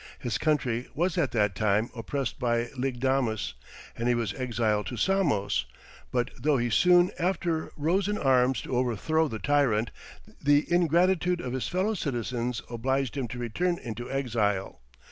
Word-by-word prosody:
His 115 -4 -3
country 130 -6 0
was 175 +3 0
at 165 -7 +1
that 105 -3 +2
time 105 +3 +1
oppressed 130 +4 -3
by 120 -1 0
Lygdamis, 125 - 0 0.4
and 115 - -2
he 120 - +3
was 115 -5 -1
exiled 115 -4 -1
to 125 - -5
Samos; 115 - +1 0.5
but 120 -1 0
though 145 +2 +2
he 120 -1 -1
soon 180 +4 +5
after 170 -2 -1
rose 175 +7 +1
in 210 0 -1
arms 130 -3 +3
to 130 - -3
overthrow 130 +6 +1
the 115 - -4
tyrant, 125 -4 +1 0.5
the 145 +1 +4
ingratitude 175 +1 +3
of 125 -6 -4
his 130 - -2
fellow 190 +5 0
citizens 125 - -2
obliged 130 +2 -1
him 135 -3 -2
to 125 - -7
return 170 +10 -1
into 120 -2 -6
exile. 105 - -1
130 Hz, 155 wpm, -28 LUFS, 115-160 Hz, 0.5 s, soon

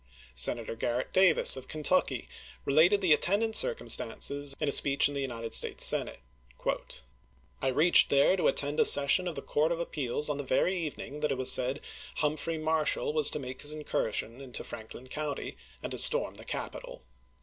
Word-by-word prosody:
Senator 115 - +1
Grarrett 120 +2 -4
Davis 185 -4 +5
of 130 -1 -9
Ken 155 -1 -8
tucky - - 0 0.4
related 170 +8 +2
the 180 -5 +3
attendant 205 +8 -1
circumstances 145 - +1
in 150 - -2
a - - 0
speech 140 0 +5
in 145 - -8
the 140 - -4
United 115 -4 -6
States - - +3
Senate: - - +3 1.4
I 135 - -2
reached 155 +7 +4
there 140 +6 +3
to 185 - -1
attend 145 +1 -1
a - - +4
session 145 +6 +5
of 170 - -5
the - - -7
Court 155 +3 -1
of 170 - -3
Appeals 150 -4 -3
on 150 -2 -2
the 145 - -5
very 140 +8 -1
evening 150 -3 -7
that 150 -1 -2
it 135 - -3
was 130 0 +2
said 130 +3 0 0.3
Humphrey 155 +2 -3
Marshall 155 -1 -2
was 155 -2 +5
to - - -4
make 130 -2 -8
his 145 - 0
incursion 125 -4 -4
into 125 -4 -7
Franklin 115 +2 -10
County, 150 +2 -6 0.3
and - - -6
to - - 0
storm 485 +1 +3
the - - -13
capital. - - -8
145 Hz, 185 wpm, -28 LUFS, 130-160 Hz, 1.4 s, Davis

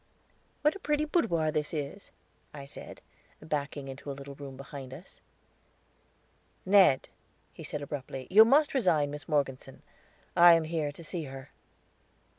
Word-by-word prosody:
"What 300 +4 +3
a - - -8
pretty 300 -3 0
boudoir 170 - +1
this 155 +1 -2
is," 150 +7 -5 0.5
I 140 -1 -8
said, 140 - -10 0.4
backing 145 -2 -4
into 135 +2 -8
a - - -3
little 140 0 -9
room 135 -1 -9
behind 135 -1 -9
us. 175 - -14 1.4
"Ned," 185 -8 +5 0.5
he - - -10
said 145 - -4
abruptly, 135 -2 -6
"you 215 +4 +9
must 285 +6 +4
resign 165 - +2
Miss 145 0 -8
Morgeson; 135 -3 -2 0.5
I 175 0 +9
am 165 -1 +3
here 155 -2 -2
to 165 - -12
see 165 0 -2
her." 135 0 -10
150 Hz, 145 wpm, -29 LUFS, 140-175 Hz, 1.4 s, you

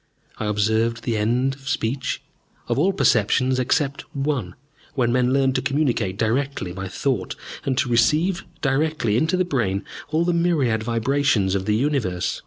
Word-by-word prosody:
I - - -2
observed 110 +2 +1
the 115 - -1
end 120 +5 +1
of 135 0 -9
speech, 130 +1 -2 0.4
of - - 0
all 185 +6 +3
perceptions 130 - +2
except 140 +2 0
one, 135 -10 -2 0.4
when 120 -3 +2
men 125 0 +2
learned 135 -1 +2
to - - 0
communicate 130 -8 0
directly 115 -3 -1
by 95 +1 -5
thought, 105 0 -2 0.3
and 130 -2 0
to 130 - +2
receive 150 +10 +2 0.2
directly 145 -5 +1
into 160 +9 +2
the 185 - +2
brain 110 - -1 0.2
all 160 +3 +1
the 175 - +1
myriad 155 -10 +1
vibrations 115 -3 +1
of 95 -1 -1
the 105 - +2
universe. 115 -9 0
130 Hz, 160 wpm, -23 LUFS, 110-140 Hz, 0.4 s, all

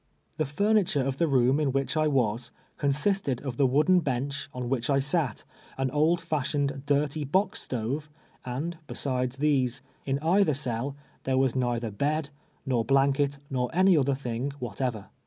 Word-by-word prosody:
The 155 - 0
furniture 200 -2 +2
of 135 0 -2
the 165 - +2
room 130 0 +3
in 145 -3 +1
which 135 +3 -1
I 155 0 +2
was, 120 -4 0 0.3
consisted 145 - +1
of 130 -4 -5
the 135 - +4
wooden 155 +8 +4
bench 140 -2 -2
on 125 -2 -5
wdiichi 135 +2 +1
sat, 145 -6 0 0.3
an 135 -1 -1
old 155 +4 +3
fashioned, 140 -3 -1
dirty 145 +1 +1
box 190 +9 +1
stove, 130 +6 -2 0.3
and 155 +7 -4
besides 125 -1 -1
these, 135 -4 +1 0.2
in 135 0 +1
either 165 +1 +3
cell, 130 0 -1 0.3
thei'c 130 0 +1
was 130 -2 +2
neither 120 -3 -1
bed, 150 +7 -1 0.3
nor 125 -4 +1
blanket, 140 +2 +2
nov 125 -2 0
any 185 +1 +5
other 140 -2 +2
thing 125 0 -3
whatever. 120 -3 -3
140 Hz, 155 wpm, -27 LUFS, 125-150 Hz, 0.3 s, any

